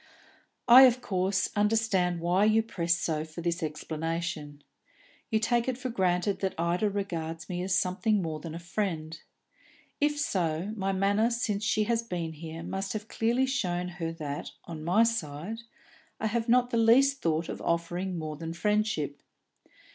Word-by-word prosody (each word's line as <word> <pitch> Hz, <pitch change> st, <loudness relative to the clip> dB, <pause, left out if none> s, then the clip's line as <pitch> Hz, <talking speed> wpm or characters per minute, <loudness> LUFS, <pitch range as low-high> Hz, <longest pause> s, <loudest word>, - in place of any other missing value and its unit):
"I, 255 Hz, +2 st, +10 dB
of 250 Hz, 0 st, +1 dB
course, 190 Hz, -3 st, 0 dB
understand 205 Hz, -5 st, +1 dB
why 180 Hz, +4 st, +3 dB
you 220 Hz, +1 st, +4 dB
press 170 Hz, -6 st, 0 dB
so 155 Hz, -3 st, -1 dB
for 160 Hz, +2 st, -8 dB
this 170 Hz, +1 st, -1 dB
explanation. 155 Hz, -1 st, -4 dB, 0.7 s
You 220 Hz, -, +2 dB
take 235 Hz, +2 st, +1 dB
it 255 Hz, -2 st, -1 dB
for 255 Hz, 0 st, -4 dB
granted 185 Hz, -1 st, +1 dB
that 190 Hz, -1 st, -2 dB
Ida 175 Hz, +5 st, +1 dB
regards 165 Hz, -5 st, -4 dB
me 180 Hz, -1 st, -3 dB
as 185 Hz, 0 st, 0 dB
something 195 Hz, +4 st, +1 dB
more 160 Hz, -4 st, -3 dB
than 160 Hz, +1 st, -7 dB
a -, -, -5 dB
friend. 165 Hz, -4 st, -3 dB, 0.8 s
If 295 Hz, 0 st, +1 dB
so, 180 Hz, -, -1 dB
my 195 Hz, -2 st, -1 dB
manner 200 Hz, +4 st, +2 dB
since 220 Hz, -4 st, -1 dB
she 215 Hz, 0 st, +2 dB
has 230 Hz, +1 st, +1 dB
been 175 Hz, -7 st, -4 dB
here 160 Hz, +1 st, -8 dB
must 195 Hz, +2 st, -3 dB
have 215 Hz, 0 st, -5 dB
clearly 235 Hz, +4 st, +1 dB
shown 180 Hz, -10 st, -1 dB
her 165 Hz, 0 st, -1 dB
that, 150 Hz, -3 st, -5 dB, 0.2 s
on 160 Hz, -2 st, -7 dB
my 185 Hz, +7 st, +4 dB
side, 205 Hz, -2 st, -2 dB, 0.6 s
I -, -, -2 dB
have 225 Hz, +2 st, -1 dB
not 245 Hz, +1 st, +4 dB
the 235 Hz, -, +1 dB
least 265 Hz, +5 st, +5 dB
thought 160 Hz, 0 st, 0 dB
of -, -, -6 dB
offering 175 Hz, +2 st, -1 dB
more 155 Hz, -2 st, -5 dB
than 165 Hz, +1 st, -5 dB
friendship. 210 Hz, -6 st, 0 dB
185 Hz, 165 wpm, -29 LUFS, 165-220 Hz, 0.8 s, I